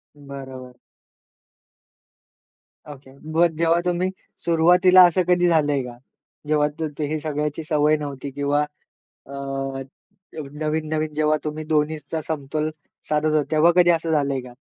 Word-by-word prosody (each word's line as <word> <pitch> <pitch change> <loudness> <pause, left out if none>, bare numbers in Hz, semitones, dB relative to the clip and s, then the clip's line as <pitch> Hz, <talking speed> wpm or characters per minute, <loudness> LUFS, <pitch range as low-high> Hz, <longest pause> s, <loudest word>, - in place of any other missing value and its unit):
बरोबर. 135 -3 -10 2.1
ओके, 140 -2 -12 0.2
मग 165 0 +2
जेव्हा 165 +1 +2
तुम्ही 180 +1 0 0.4
सुरुवातीला 180 +2 +6
असं 175 +2 +1
कधी 180 0 +3
झालंय 150 -4 +2
का, 120 -1 -9 0.5
जेव्हा 150 -1 +2 0.4
हे 155 +2 -2
सगळ्याची 150 0 -3
सवय 150 0 +2
नव्हती 140 -2 -6
किंवा 145 +1 0 0.6
अ, 135 -1 -5 0.7
नवीन-नवीन 155 +1 -2
जेव्हा 155 0 +2
तुम्ही 155 0 -4
दोन्हीचा 155 0 -1
समतोल 155 0 -3 0.4
साधत 150 0 +1
होता, 155 -1 +3
तेव्हा 160 +2 +5
कधी 175 -1 +5
असं 165 -1 0
झालंय 140 -3 +1
का? 125 -1 -12
150 Hz, 120 wpm, -22 LUFS, 140-160 Hz, 2.1 s, सुरुवातीला